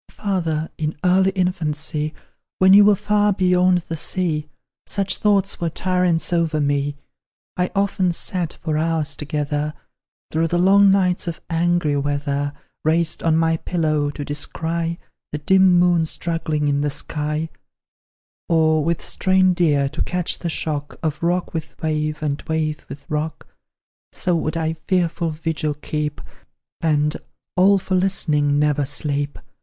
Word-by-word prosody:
"Father, 165 -6 -2
in 155 0 -2
early 190 +1 +4
infancy, 155 -4 -1 0.5
When 190 +1 +6
you 205 +1 +8
were 210 0 +6
far 210 +1 +2
beyond 180 -2 +3
the 165 - -3
sea, 155 -2 -2 0.4
Such 195 -1 0
thoughts 200 -3 +1
were 170 - +1
tyrants 180 0 0
over 165 -2 +1
me! 145 0 0 0.6
I 180 0 0
often 195 -2 +1
sat, 170 0 -3
for 155 -2 0
hours 160 -2 0
together, 150 0 -2 0.6
Through 165 +1 +1
the 175 - 0
long 195 +3 +6
nights 185 -2 +2
of 170 - -4
angry 170 -2 +1
weather, 145 0 -1 0.3
Raised 160 +1 +1
on 160 -1 +2
my 165 0 +2
pillow, 155 -4 0
to 145 0 -6
descry 165 +3 -3 0.3
The 150 - -2
dim 190 +4 +4
moon 175 -2 +3
struggling 160 -3 -2
in 145 0 +1
the 145 - +1
sky; 150 +2 -3 1.0
Or, 160 -2 +3
with 165 +1 -1
strained 185 -1 +2
ear, 145 -4 +3
to 155 +3 -5
catch 180 -1 -1
the 170 - -3
shock, 150 -2 -3
Of 155 -2 -2
rock 175 +1 0
with 160 -1 -6
wave, 155 -1 -2
and 145 -1 -1
wave 155 -2 -2
with 140 0 -9
rock; 155 +1 -3 0.7
So 180 - 0
would 160 0 -1
I 160 0 0
fearful 170 0 -1
vigil 155 -1 -2
keep, 150 0 -4 0.6
And, 150 -2 +1 0.4
all 195 +2 +5
for 190 0 -4
listening, 155 -6 +2
never 145 -1 +1
sleep. 145 0 -2
160 Hz, 145 wpm, -21 LUFS, 150-180 Hz, 1.0 s, you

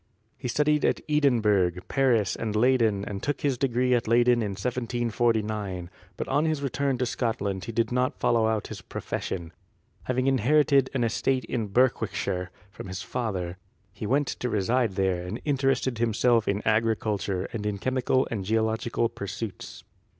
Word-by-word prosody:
He 130 - -6
studied 150 +5 +2
at - - +2
Edinburgh, 110 - +3
Paris 120 -9 +2
and 110 -2 -3
Leyden 110 -4 +3
and 100 -1 -5
took 145 -1 -2
his 140 -3 +1
degree 125 0 +1
at 120 -3 +1
Leyden 120 +1 +4
in 105 -3 -2
1749, 110 -5 -1 0.3
but - - -3
on 145 +3 +2
his 155 -3 -1
return 140 0 0
to 125 - 0
Scotland 100 -6 -2
he 115 - -4
did 115 +1 0
not 125 +1 0
follow 115 -1 +3
out 110 -2 0
his - - -7
profession. 85 -2 -5 0.5
Having 130 0 0
inherited 135 +1 +3
an 125 - +1
estate 130 +3 0
in 115 -4 -2
Berwickshire 100 -5 0 0.2
from 100 - -9
his 95 0 -5
father, 95 -7 -3 0.3
he 105 +1 -5
went 145 +5 +2
to 125 - -3
reside 115 +1 +1
there 95 -2 0
and 95 +6 -5
interested 135 -4 +1
himself 115 0 +2
in 100 +1 0
agriculture 110 -3 0
and 110 -3 -3
in 105 -1 -2
chemical 130 +3 +1
and 105 -5 -2
geological 110 +3 0
pursuits. 100 -1 -7
115 Hz, 155 wpm, -27 LUFS, 105-130 Hz, 0.5 s, Leyden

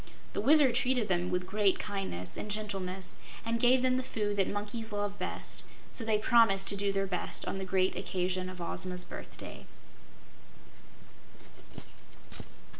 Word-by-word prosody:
The - - -1
Wizard 280 +1 +6
treated 245 -3 +1
them 175 -1 +1
with 180 0 0
great 200 0 +2
kindness 190 - -4
and 210 - -5
gentleness 195 -3 -2 0.3
and 230 0 0
gave 250 +2 +5
them 255 0 +3
the - - +1
food 210 -5 -2
that 195 - +3
monkeys 210 +2 -4
love 205 0 -2
best, - - -4 0.3
so 230 - -1
they 220 -1 +2
promised 210 -3 +4
to 200 - 0
do 200 0 +1
their 195 0 0
best 180 -2 -2
on 195 - -2
the 190 - -3
great 185 0 +1
occasion 185 0 -1
of 185 -1 -9
Ozma's 180 +1 0
birthday. - - -9
200 Hz, 150 wpm, -31 LUFS, 185-225 Hz, 0.3 s, Wizard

